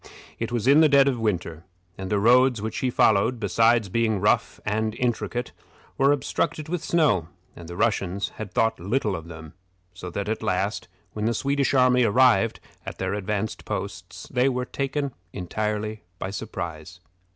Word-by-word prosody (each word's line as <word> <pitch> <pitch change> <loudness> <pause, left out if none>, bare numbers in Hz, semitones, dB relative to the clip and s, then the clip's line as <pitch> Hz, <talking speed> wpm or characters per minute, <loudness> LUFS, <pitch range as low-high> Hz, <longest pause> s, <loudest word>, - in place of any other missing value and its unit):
It 115 +1 -3
was 120 -2 -1
in 140 +4 +6
the 155 - +6
dead 140 -1 +5
of 130 -4 0
winter, 85 -7 -2 0.3
and 95 -1 -6
the 105 - +1
roads 125 +3 +4
which 110 +1 -4
he 130 - 0
followed, 115 +1 +3
besides 115 +2 +3
being 110 +1 0
rough 105 - +1
and 110 +1 -1
intricate, 120 0 -2 0.4
were 135 +1 +4
obstructed 145 +2 -1
with 170 0 -3
snow, 125 - +2 0.3
and 85 - -11
the 85 - -8
Russians 100 -2 0
had 105 -3 -6
thought 115 +4 +1
little 105 +2 -1
of 80 -1 -7
them, 80 -2 -10 0.4
so 90 0 -8
that 100 +3 -4
at 110 +1 -2
last, - - -1 0.3
when 105 0 -3
the 115 +1 +1
Swedish 140 +2 0
army 125 -1 +4
arrived 115 -1 +3 0.2
at - - -7
their - - -2
advanced 105 +1 -3
posts, - - -6
they 125 +2 +3
were 125 -1 -2
taken 140 +1 -3 0.2
entirely 105 +3 -3 0.2
by 95 - -4
surprise. 90 -5 -6
110 Hz, 170 wpm, -25 LUFS, 100-125 Hz, 0.4 s, in